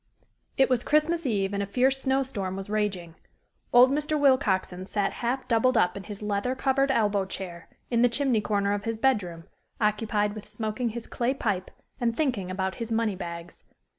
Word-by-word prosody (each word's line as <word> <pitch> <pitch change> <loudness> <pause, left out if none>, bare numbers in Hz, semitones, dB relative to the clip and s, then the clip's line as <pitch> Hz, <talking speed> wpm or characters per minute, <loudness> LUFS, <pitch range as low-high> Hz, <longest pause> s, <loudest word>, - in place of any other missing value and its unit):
It 265 - +5
was 250 -2 +1
Christmas 305 +1 +2
Eve 200 -4 0
and 200 - -1
a 200 - -2
fierce 260 +5 +2
snow 270 0 +2
storm 200 -8 -4
was 195 +1 -6
raging. 195 -6 -1 0.6
Old 250 +2 +7
Mr. 300 +1 0
Willcoxen 195 -10 +2
sat 200 -1 0
half 250 +3 -1
doubled 240 +1 +3
up 180 -3 +3
in 200 - -7
his 210 -1 -8
leather 210 +5 -1
covered 275 +1 +1
elbow 210 -6 +2
chair, 185 -3 -7 0.2
in 235 -1 +3
the 245 - +5
chimney 245 -2 +1
corner 200 -1 0
of 205 0 -3
his 225 -1 -2
bedroom, 205 -10 0 0.4
occupied 210 -1 +1
with 215 -1 -10
smoking 220 +2 -2
his 230 +1 -6
clay 250 +3 -1
pipe, 200 -8 -2 0.3
and 230 -1 0
thinking 245 - 0
about 190 0 -2
his 230 0 -4
money 225 -3 +1
bags. 170 -1 -8
215 Hz, 185 wpm, -27 LUFS, 195-255 Hz, 0.6 s, Old